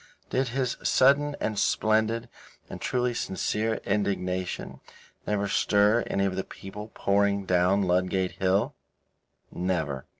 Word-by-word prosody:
Did 130 Hz, +1 st, +1 dB
his 125 Hz, 0 st, -1 dB
sudden 145 Hz, +2 st, +3 dB
and 105 Hz, -2 st, -1 dB
splendid 110 Hz, +3 st, +1 dB, 0.4 s
and -, -, -7 dB
truly 125 Hz, -1 st, 0 dB
sincere 110 Hz, +1 st, -1 dB
indignation 95 Hz, -3 st, -2 dB, 0.5 s
never 100 Hz, -1 st, 0 dB
stir 105 Hz, +3 st, +3 dB
any 100 Hz, -, 0 dB
of 95 Hz, -1 st, -1 dB
the 95 Hz, -, -2 dB
people 100 Hz, +2 st, -9 dB
pouring 100 Hz, 0 st, +1 dB
down 90 Hz, +2 st, +3 dB
Ludgate 90 Hz, 0 st, +1 dB
Hill? 95 Hz, +2 st, +2 dB, 0.8 s
Never. 80 Hz, -7 st, -2 dB
100 Hz, 120 wpm, -27 LUFS, 95-110 Hz, 0.8 s, sudden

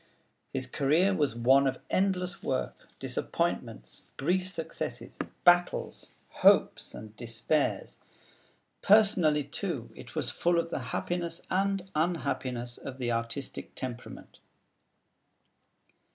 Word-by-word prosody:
His 130 Hz, -, -2 dB
career 150 Hz, +9 st, +2 dB
was 145 Hz, -10 st, +1 dB
one 135 Hz, +4 st, +5 dB
of 130 Hz, -1 st, -1 dB
endless 185 Hz, -2 st, 0 dB
work, 65 Hz, -1 st, -3 dB
disappointments, -, -, -3 dB, 0.2 s
brief 180 Hz, +6 st, +1 dB
successes, 185 Hz, -, -5 dB, 0.2 s
battles, 175 Hz, 0 st, +3 dB, 0.2 s
hopes, -, -, +3 dB
and 110 Hz, 0 st, -10 dB
despairs. 120 Hz, +6 st, -1 dB, 0.8 s
Personally, 190 Hz, -8 st, +5 dB
too, -, -, -4 dB
it -, -, -12 dB
was -, -, -1 dB
full 175 Hz, 0 st, +1 dB
of 165 Hz, 0 st, 0 dB
the 130 Hz, -, -3 dB
happiness 170 Hz, +2 st, -2 dB
and 195 Hz, 0 st, +1 dB
unhappiness 130 Hz, -7 st, -1 dB
of 130 Hz, -, -7 dB
the 120 Hz, -2 st, -1 dB
artistic 115 Hz, +4 st, -4 dB
temperament. 120 Hz, -2 st, -7 dB
150 Hz, 105 wpm, -30 LUFS, 125-180 Hz, 0.8 s, one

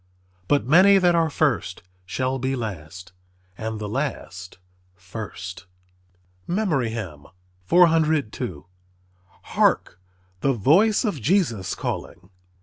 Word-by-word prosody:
But 145 Hz, -4 st, +2 dB
many 185 Hz, +8 st, +6 dB
that 180 Hz, -2 st, +4 dB
are 165 Hz, -1 st, +2 dB
first 135 Hz, -, -1 dB, 0.2 s
shall 130 Hz, +5 st, -2 dB
be 130 Hz, +2 st, -1 dB
last; 90 Hz, -5 st, -7 dB, 0.4 s
and 110 Hz, +2 st, -5 dB
the 105 Hz, 0 st, -5 dB
last 105 Hz, -7 st, -5 dB, 0.4 s
first." 95 Hz, 0 st, -8 dB, 0.8 s
MEMORY 170 Hz, -, 0 dB
HYMN 95 Hz, -11 st, -7 dB, 0.4 s
_"Hark, 95 Hz, -, 0 dB, 0.4 s
the 135 Hz, +7 st, +1 dB
voice 185 Hz, -, +3 dB
of 195 Hz, -, -2 dB
Jesus 120 Hz, -, +1 dB
calling." 90 Hz, +3 st, -6 dB
115 Hz, 95 wpm, -23 LUFS, -, 0.8 s, many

